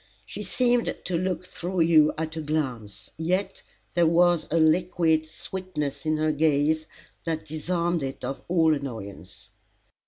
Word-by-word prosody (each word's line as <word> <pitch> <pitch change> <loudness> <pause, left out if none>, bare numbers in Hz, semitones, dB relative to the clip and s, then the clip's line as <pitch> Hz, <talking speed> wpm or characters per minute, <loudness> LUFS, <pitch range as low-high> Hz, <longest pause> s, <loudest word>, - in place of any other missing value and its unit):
She - - -7
seemed 245 -1 +1
to 180 - -2
look 185 +1 -1
through 180 0 -3
you 160 -2 +5
at 160 0 -3
a 160 - -3
glance, 135 -9 -3
yet 180 +5 -1 0.3
there 170 -2 +4
was 175 0 +3
a 165 - +1
liquid 160 -1 +3
sweetness 155 -3 -5
in 155 0 +2
her 155 0 +1
gaze, 155 +1 +2 0.4
that 160 -2 -2
disarmed 170 +2 -1
it 135 -1 -5
of 135 - -4
all 165 -3 +4
annoyance. 100 - -7
160 Hz, 145 wpm, -26 LUFS, 150-175 Hz, 0.4 s, you